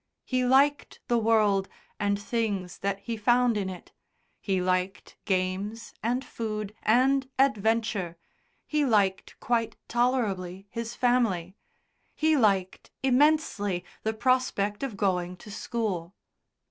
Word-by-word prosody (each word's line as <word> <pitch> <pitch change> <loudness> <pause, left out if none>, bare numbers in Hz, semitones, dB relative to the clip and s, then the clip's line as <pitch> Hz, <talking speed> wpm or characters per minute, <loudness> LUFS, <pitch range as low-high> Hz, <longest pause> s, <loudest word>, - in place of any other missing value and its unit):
He 255 -1 0
liked 275 +3 +3
the 240 -1 +3
world 210 -3 +3 0.3
and 200 -1 +1
things 205 -4 -2
that 200 0 -2
he 230 +3 -4
found 240 +2 +3
in 200 -2 -1
it. 180 -2 -9 0.5
He 190 -2 0
liked 185 +2 -1
games, 195 +4 -2
and 245 +4 -1
food, 215 -2 -4
and 260 +4 +3
adventure 220 -8 +1 0.5
he 300 -1 +1
liked 205 -7 +1
quite 230 -2 0
tolerably 200 -7 0
his 230 0 -5
family 220 -8 +1 0.6
he 315 0 +3
liked 195 -7 +1
immensely 255 - +2 0.2
the 220 - -1
prospect 220 -5 +1
of 260 -7 -4
going 180 -2 0
to 210 - -12
school. 200 -5 -3
215 Hz, 120 wpm, -27 LUFS, 195-245 Hz, 0.6 s, liked